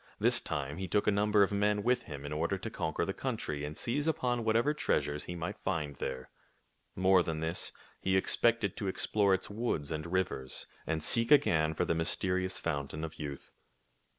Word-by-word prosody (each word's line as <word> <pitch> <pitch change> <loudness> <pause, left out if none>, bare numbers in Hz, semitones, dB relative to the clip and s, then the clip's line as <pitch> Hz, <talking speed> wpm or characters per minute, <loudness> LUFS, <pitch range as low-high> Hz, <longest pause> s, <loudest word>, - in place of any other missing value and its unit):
This - - +3
time 75 +1 -4
he 95 0 -4
took 100 +4 +1
a - - +4
number 105 0 +4
of 100 - 0
men 105 0 +1
with 125 +1 +2
him 70 -1 -7
in 75 - -4
order 85 +5 0
to 110 +4 -6
conquer 80 -2 -2
the 95 - -2
country 105 - -3
and 75 +1 -5
seize 145 +6 -1
upon 125 -6 0
whatever 115 +6 +2
treasures 75 - 0
he 90 - -5
might 85 0 -5
find 75 -7 -2
there. 65 -1 -5 0.6
More 95 0 +5
than 80 -2 -3
this, 80 +2 0 0.3
he 95 0 +2
expected 110 +1 +3
to 100 - -3
explore 100 +1 +3
its 95 - -6
woods 100 -10 -2
and 75 +2 -3
rivers 85 -8 -2 0.2
and 80 -1 -1
seek 115 +8 +2
again 80 - +4
for - - +1
the - - +1
mysterious 95 +3 +1
fountain 70 +2 -3
of 80 - -6
youth. 70 -3 -6
95 Hz, 190 wpm, -32 LUFS, 75-105 Hz, 0.6 s, More